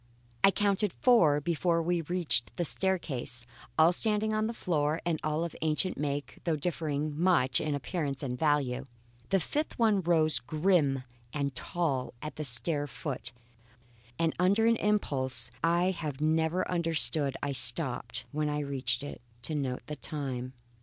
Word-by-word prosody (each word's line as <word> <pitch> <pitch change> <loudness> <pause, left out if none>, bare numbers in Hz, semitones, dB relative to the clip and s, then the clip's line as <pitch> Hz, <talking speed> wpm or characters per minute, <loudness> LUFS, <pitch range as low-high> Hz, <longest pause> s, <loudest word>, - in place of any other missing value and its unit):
I - - +8
counted 200 -1 +1
four 170 - +4
before 170 +2 0
I 175 0 0
reached 175 -9 +1
the 175 - 0
staircase, 140 -10 -2 0.3
all 160 +2 +6
standing 215 +2 0
on 215 0 0
the - - -2
floor 155 -4 0
and 165 -3 0
all 155 +1 0
of 170 - -5
ancient 160 +4 0
make, 145 0 -4
though 165 -2 0
differing 150 -2 -2
much 160 -7 +2
in 150 -1 -1
appearance 140 -1 -3
and 125 -2 -2
value. 135 -2 0 0.4
A 195 - +4
fifth 295 - -3
one 215 -4 +3
rose 160 -3 +2
grim 155 -5 +1 0.3
and 140 -2 -2
tall 135 -1 -2
at 150 - -7
the 155 - -4
stair 145 +3 +1
foot, 140 0 -5 0.9
and 165 +1 +1
under 200 +5 +3
an 230 0 +4
impulse 130 - 0
I 170 +3 +3
have 155 -6 -5
never 160 +3 +1
understood 160 -4 +2
I 145 - -1
stopped, 125 -1 +4
when 150 0 -1
I 150 0 -1
reached 140 -1 0
it, 145 - -8 0.2
to 155 - -1
note 135 -4 -3
the 150 - -6
time. 130 -4 -3
155 Hz, 155 wpm, -30 LUFS, 140-175 Hz, 0.9 s, I